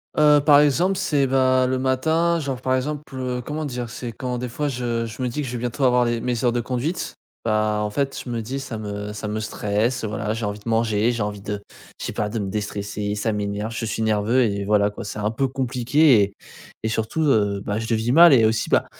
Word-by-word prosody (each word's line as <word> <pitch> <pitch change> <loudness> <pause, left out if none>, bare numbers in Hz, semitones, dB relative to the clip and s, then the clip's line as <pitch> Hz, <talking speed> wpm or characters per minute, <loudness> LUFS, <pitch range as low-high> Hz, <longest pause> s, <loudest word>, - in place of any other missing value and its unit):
Heu, 150 -1 +5
par 145 -1 +7
exemple, 175 +7 +2
c'est 145 -5 +1
et - - +2
ben, 130 -1 +3
le 130 0 0
matin, 160 +6 +1
genre, 135 -4 -4
par 130 0 +1
exemple, 145 +3 -2
heu, 125 -1 -3
comment 155 +1 -3
dire, 120 -3 -4
c'est 120 0 -6
quand 125 +2 -4
des 125 0 -4
fois 145 +5 -2
je 120 -3 -2
je 110 +2 -8
me 125 - 0
dis 125 +5 -3
que 140 - -4
je 125 - -5
vais - - -2
bientôt 125 +3 -3
avoir 125 -1 +4
les 120 -1 -1
mes 125 -2 -2
heures 120 - +3
de 120 - 0
conduite, 130 +9 -3 0.3
bah, 110 -1 +1
en 105 - -1
fait, 135 +5 -2
je 125 - -8
me 115 -1 -2
dis: 130 +5 -4
«Ça 130 -5 -6
me 105 0 -5
ça 105 0 -5
me 105 +1 -2
stresse», 110 +3 -1
heu, - - -1
voilà, 110 +1 -2
j'ai 110 -1 -3
envie 105 0 -4
de 110 - -7
manger, 115 0 +2
j'ai 115 -2 -3
envie 105 -1 -4
de 100 0 -4 0.4
je - - -5
sais - - -4
pas, 105 - -1
de 115 +1 -3
me 100 -1 -3
déstresser. 105 0 -3
Ça 110 +2 -1
m'énerve 105 +2 -3
je 115 - -3
suis 110 0 -3
nerveux 110 +4 +2
et 100 -3 -1
voilà, 105 0 +3
quoi, 105 - -8
c'est 105 +1 -6
un 105 +1 0
peu 135 +4 0
compliqué, 130 0 +3
et 100 0 0 0.5
et 110 - 0
surtout, 110 +8 -1
heu, 105 -8 +2
bah, 105 +1 -1
je 115 - -4
le - - +4
vis 115 +2 0
mal, 170 -1 +8
et 115 -4 +6
aussi, 110 +1 +1
ben, - - +3
120 Hz, 260 wpm, -23 LUFS, 105-130 Hz, 0.5 s, mal